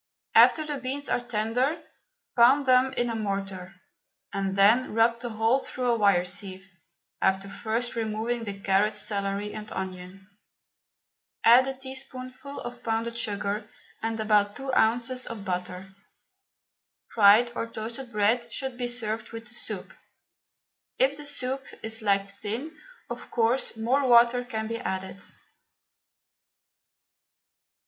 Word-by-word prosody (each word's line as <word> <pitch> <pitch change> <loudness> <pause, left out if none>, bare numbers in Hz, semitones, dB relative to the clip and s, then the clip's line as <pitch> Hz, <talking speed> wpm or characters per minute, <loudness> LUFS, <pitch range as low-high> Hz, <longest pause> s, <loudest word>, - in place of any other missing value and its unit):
After 310 - +6
the 295 -1 -3
beans 270 +3 -4
are - - +2
tender, 245 +5 -1 0.6
pound 260 +4 +6
them 255 0 +4
in 240 -1 0
a - - -3
mortar, 195 -3 -4 0.6
and 195 -1 -1
then 220 +4 +4
rub 230 +1 +3
the 240 0 -5
whole 225 +4 +2
through 250 -2 -2
a - - +3
wire 200 -5 +3
sieve, 190 +1 -3 0.5
after 190 +1 +1
first 225 +4 -3
removing 225 +1 -2
the 200 -2 -6
carrot, 200 +2 +2
celery 200 0 -2
and 215 0 -8
onion. 185 0 -7 1.2
Add 245 +3 +7
a 270 - -3
teaspoonful 265 +1 -8
of 240 0 -8
pounded 230 +1 -1
sugar 205 -1 -2 0.3
and 225 0 -2
about 210 -1 +2
two 270 -1 -4
ounces 245 +3 +1
of 215 -3 -7
butter. 180 +1 -4 1.2
Fried 220 +3 +6
or 230 - -3
toasted 230 +3 -6
bread 230 +3 +1
should 265 -2 -4
be 245 - -1
served 225 -2 -3
with 230 +1 -8
the - - -12
soup. - - -4 1.0
If 270 +2 +3
the 295 0 -7
soup 265 -1 -3 0.2
is 225 +1 -1
liked 200 -2 +2
thin, 220 +10 -5 0.3
of - - -7
course 230 +1 +1
more 260 +5 +1
water 240 0 +5
can 220 -3 -4
be 230 +1 -4
added. 190 -3 -4
225 Hz, 135 wpm, -27 LUFS, 205-245 Hz, 1.2 s, Add